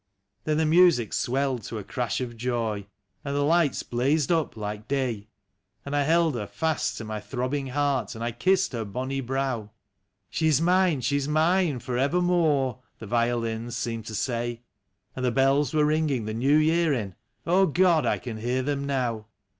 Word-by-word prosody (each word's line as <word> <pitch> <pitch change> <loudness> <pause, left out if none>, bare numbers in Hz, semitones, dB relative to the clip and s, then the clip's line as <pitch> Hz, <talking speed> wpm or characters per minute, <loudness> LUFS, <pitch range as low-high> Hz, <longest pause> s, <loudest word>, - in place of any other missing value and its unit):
Then 155 -1 +1
the 160 - +2
music 160 - +4
swelled 130 -1 0
to 115 - -5
a 105 - -5
crash 120 +2 -2
of 120 -2 -5
joy, 115 -4 -2 0.4
and 140 0 -3
the 145 - +1
lights 160 -1 +2
blazed 140 +6 0
up 160 -8 0
like 105 0 -5
day; 125 -7 -2 0.6
And 140 +1 -3
I 145 - +3
held 165 +2 +3
her 105 -4 -4
fast 160 +5 -1
to - - -5
my 110 0 -4
throbbing 130 +5 -3
heart, 135 -5 -1
and 115 - -6
I 120 - -1
kissed 185 +8 +1
her 115 -2 -2
bonny 130 +6 -3
brow; 130 -4 -2 0.3
" 100 +1 -52
She 160 - +1
is 150 -3 +4
mine, 175 -3 +3
she 135 +4 +1
is 140 0 -2
mine 160 0 +2
for 125 0 -3
evermore 150 -4 +2
!" - - -46
the 115 - -9
violins 115 0 -1
seemed 115 -2 -4
to 110 - -5
say. 120 +1 -2 0.5
And 130 - -4
the 125 - +3
bells 135 +2 +2
were 150 -1 +3
ringing 150 -6 +1
the 110 - -3
New 135 +6 +3
Year 160 0 +3
in 105 -7 -3 0.3
— - - -41
God! 180 -2 +3
I - - +2
can 120 -3 -6
hear 125 +4 -1
them 140 0 -2
now. 120 -6 -2
135 Hz, 190 wpm, -26 LUFS, 115-155 Hz, 0.6 s, music